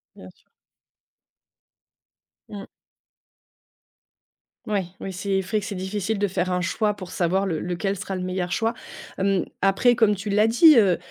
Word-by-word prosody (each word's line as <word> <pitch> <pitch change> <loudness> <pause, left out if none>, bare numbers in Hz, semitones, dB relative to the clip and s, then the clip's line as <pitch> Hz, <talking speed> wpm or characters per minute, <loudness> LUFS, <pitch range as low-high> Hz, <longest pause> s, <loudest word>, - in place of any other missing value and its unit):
Bien - - -12
sûr. - - -33 2.1
Mmh. 200 -1 -8 2.0
Ouais, 200 -3 -1
oui, 190 - -6
c'est 195 +1 -1
vrai 210 +3 -2
que - - -7
c'est 210 - -5
difficile 195 +3 -3
de 205 - +1
faire 185 -1 -2
un 180 - 0
choix 210 +4 0
pour 185 -3 -10
savoir 185 +3 0
le 165 -5 -2
lequel 180 +3 -2
sera 195 0 -5
le - - -4
meilleur 180 -1 -3
choix. 225 +3 0 0.4
Hem, 195 -1 +1 0.2
après, 195 +6 +3
comme 220 -3 +3
tu 200 +2 -6
l'as 210 +2 +3
dit, 300 +7 +7
heu 195 -6 +4
195 Hz, 155 wpm, -23 LUFS, 185-210 Hz, 2.1 s, dit